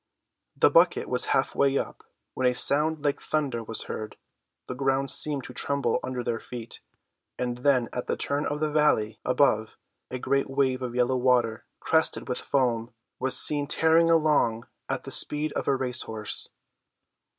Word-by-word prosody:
The - - +4
bucket - - +3
was - - +2
half - - 0
way 140 0 +2
up - - -5 0.3
when 130 - 0
a 125 - +1
sound 150 +3 +1
like 145 - 0
thunder 140 -7 -2
was 115 0 -3
heard, 110 0 -7 0.5
the - - -4
ground 135 +1 0
seemed 145 -3 +1
to 125 - -10
tremble 140 -4 -1
under 125 -1 -4
their 115 -1 -2
feet, 115 -1 -8 0.6
and 125 -1 -3
then 125 -3 +2
at 125 - -4
the - - -2
turn 145 +1 -2
of 150 +1 -4
the 155 -1 0
valley 150 -8 +1
above, 125 -4 +1 0.3
a 130 - -4
great 140 +2 -1
wave 135 -1 0
of 125 -1 -5
yellow 125 +1 +1
water, 120 -3 +1
crested - - +1
with - - -2
foam, 120 -3 -1 0.3
was 130 +1 +3
seen 145 -1 +4
tearing 160 +2 +3
along 150 -8 +2 0.2
at - - -3
the - - -7
speed 150 +1 +3
of - - -4
a 140 - +3
race 130 -1 0
horse. 110 -2 -3
130 Hz, 175 wpm, -26 LUFS, 120-145 Hz, 0.6 s, The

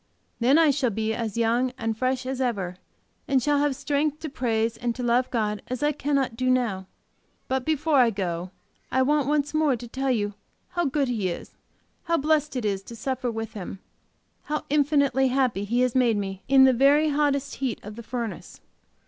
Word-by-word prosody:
Then 255 +5 +4
I 320 -3 +5
shall 270 -3 +1
be 220 +1 -1
as 225 -2 -3
young 235 +2 +1
and 225 0 -2
fresh 255 +2 -1
as 265 0 -3
ever, 195 -8 -2 0.5
and 270 -1 +3
shall 290 +3 +1
have 290 -2 +1
strength 290 +2 -1
to 315 - -4
praise 230 -4 0
and 240 -1 -2
to 250 - -5
love 245 +1 +2
God 210 -3 -1
as 255 +2 -4
I 295 - +3
cannot 275 -4 -1
do 255 +2 0
now. 225 -7 0 0.6
But 260 -1 -1
before 310 -1 +1
I 245 -3 +6
go 180 -4 -3 0.4
I 260 - +3
want 290 0 +2
once 295 0 0
more 310 -4 +2
to 240 +1 -8
tell 265 +3 -2
you 210 -4 0 0.4
how 345 -1 -1
good 280 0 +1
He 215 -7 -1
is, 170 - -6 0.5
how 335 -1 +2
blessed 300 -1 +1
it 245 -3 -2
is 195 -2 0
to 235 - -9
suffer 255 +2 -2
with 225 -1 -5
Him, 195 -2 -6 0.7
how 300 0 -3
infinitely 280 -3 +3
happy 250 -6 +1
He 240 +4 +1
has 250 -2 +2
made 245 -4 +3
me 195 -1 -4
in 270 0 +6
the 260 -1 +6
very 285 +5 +4
hottest 280 -1 0
heat 260 -4 -2
of 210 +1 -8
the 235 - -8
furnace. 230 -5 -6
255 Hz, 200 wpm, -25 LUFS, 225-280 Hz, 0.7 s, I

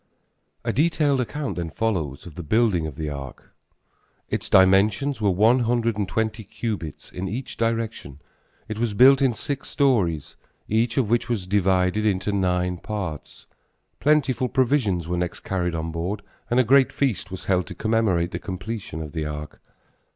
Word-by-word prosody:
A - - -1
detailed 145 -3 +2
account 135 +2 -4
then 85 -2 -3
follows 80 -11 -2
of 85 - -10
the 90 - -7
building 90 -1 +2
of 75 - -8
the 75 0 -4
ark. 70 -3 -9 0.8
Its - - -2
dimensions 100 +8 +4
were 105 - +3
one 110 +7 +4
hundred 115 -1 +1
and 100 -2 -2
twenty 110 0 -1
cubits 100 -7 -5
in 95 +1 -4
each 120 +6 -5
direction. 115 -11 -2 0.5
It 110 0 -5
was 115 -3 -1
built 135 +4 +7
in 130 -3 +3
six 135 +4 -4
stories, 100 - +1 0.3
each 115 +3 +1
of 120 -5 +1
which 120 +1 +1
was 110 -6 -1
divided 95 +1 +2
into 105 -1 +1
nine 90 -2 0
parts. 95 -9 -6 0.5
Plentiful 135 -4 +2
provisions 115 - +1
were 90 +1 -1
next 90 0 -3
carried 90 -3 -2
on 80 0 -3
board 90 +6 -3 0.3
and 120 - +3
a - - +6
great 135 +3 +5
feast 125 -8 -1
was 95 0 -8
held 90 -2 +1
to - - -8
commemorate 110 -6 +1
the - - -4
completion 95 -4 -5
of 75 - -8
the 80 -1 -3
ark. 75 0 -7
105 Hz, 165 wpm, -24 LUFS, 90-120 Hz, 0.8 s, built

